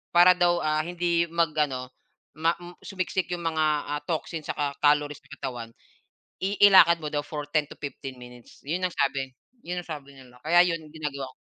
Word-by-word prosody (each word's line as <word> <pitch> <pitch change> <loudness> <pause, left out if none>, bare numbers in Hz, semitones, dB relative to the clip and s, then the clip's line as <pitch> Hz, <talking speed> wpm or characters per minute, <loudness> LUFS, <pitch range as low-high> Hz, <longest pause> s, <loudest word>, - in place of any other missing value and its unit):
para 175 +1 +8
daw, 175 -1 +3
ah, 155 0 +1
hindi 170 -1 +1
mag-ano, 150 -6 0 0.5
ma 165 +2 +2
m 175 0 -11
su-miksik 185 -2 -2
'yong 175 -1 -3
mga, 160 -1 +1 0.2
ah, 145 0 -2
toxin 165 -1 -3
saka 140 -1 -2
calories 145 0 +3
sa - - -24
katawan, 120 -4 -5 0.7
i 200 +2 -1
i-lakad 170 -4 +8
mo 150 - -3
daw 145 - +1
for 150 -1 -5
10-15 145 -3 -3
minutes. 125 -1 -14
'Yon 170 +6 -2
ang 180 - -2
sabi, 135 -1 -1 0.3
'yon 180 +1 -3
ang 175 - -19
sabi 140 -3 -7
nila, 130 -2 -16
kaya 175 +2 +6
'yon 170 -2 0 0.2
gina-gawa 145 -3 -4
ko - - -31
155 Hz, 175 wpm, -26 LUFS, 140-175 Hz, 0.7 s, para